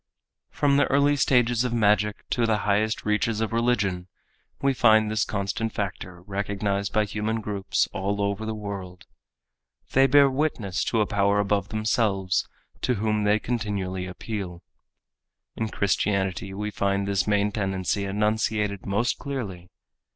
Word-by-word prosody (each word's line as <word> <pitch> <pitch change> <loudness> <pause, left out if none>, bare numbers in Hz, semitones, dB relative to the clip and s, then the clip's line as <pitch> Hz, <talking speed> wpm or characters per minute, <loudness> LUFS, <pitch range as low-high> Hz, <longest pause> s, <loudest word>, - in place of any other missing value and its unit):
From 140 -1 +2
the 145 - +3
early 140 +1 +3
stages 120 -3 +3
of 125 -2 -2
magic 105 -2 +1
to 120 -2 +2
the 110 -1 +2
highest 105 +2 +1
reaches 105 +1 +1
of 110 0 -2
religion 105 -7 0 0.5
we 140 0 +2
find 110 -3 +4
this 110 -1 +1
constant 105 +2 -2
factor 90 -3 -5
recognized 100 0 -2
by 110 0 +2
human 110 +2 -2
groups 100 -3 -1
all 100 +2 -2
over 100 +1 -1
the 110 0 -3
world. 100 -4 -7 0.9
They 135 +1 +5
bear 140 +1 +6
witness 130 -9 -1
to 115 - +1
a - - +3
power 100 0 +2
above 100 -1 0
themselves 105 -4 0 0.3
to 125 - +1
whom 105 0 0
they 105 +1 +4
continually 100 -5 -3
appeal. 90 -2 -6 0.9
In 110 -1 -2
Christianity 95 -2 0
we 105 +2 -4
find 100 0 0
this 100 0 0
main 105 0 +2
tendency 95 -1 -1
enunciated 105 0 0
most 105 +5 0
clearly. 100 -11 -5
105 Hz, 145 wpm, -25 LUFS, 100-110 Hz, 0.9 s, bear